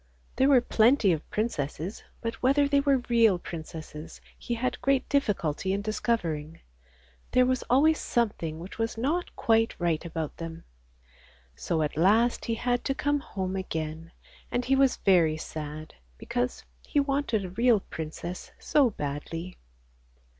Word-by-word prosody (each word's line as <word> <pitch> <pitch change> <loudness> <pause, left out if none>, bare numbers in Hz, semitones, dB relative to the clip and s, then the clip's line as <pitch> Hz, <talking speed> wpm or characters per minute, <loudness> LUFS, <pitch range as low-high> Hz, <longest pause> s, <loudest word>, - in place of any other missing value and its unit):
There 265 +2 +4
were 265 -3 +6
plenty 230 -2 +4
of 160 -2 -2
princesses, 180 -3 -3 0.2
but 230 0 -2
whether 275 +3 +4
they 280 0 +3
were 275 -3 +2
real 230 -5 +4
princesses 160 -2 -8 0.2
he 240 - -4
had 255 +2 -2
great 275 -1 +2
difficulty 190 - 0
in 200 +1 -2
discovering; 170 -8 -2 0.7
there 255 0 +5
was 255 0 +1
always 300 +5 +4
something 200 -9 -1
which 180 +7 -9
was 225 0 -1
not 305 +10 -1
quite 225 0 +2
right 170 -3 0
about 160 -3 -4
them. 165 0 -7 0.9
So 160 - -1
at 150 - -2
last 220 +8 +3
he 230 - -1
had 245 +1 0
to 270 - 0
come 290 +1 +1
home 190 -7 -4
again, 160 -3 -4 0.4
and 245 0 -1
he 270 - +3
was 270 -1 +4
very 170 -5 +3
sad 155 0 -7 0.2
because 245 - -2 0.2
he 295 - 0
wanted 275 -7 0
a - - -5
real 230 +2 +4
princess 165 +2 -7
so 280 -5 +3
badly. 165 +1 -5
215 Hz, 145 wpm, -28 LUFS, 165-250 Hz, 0.9 s, were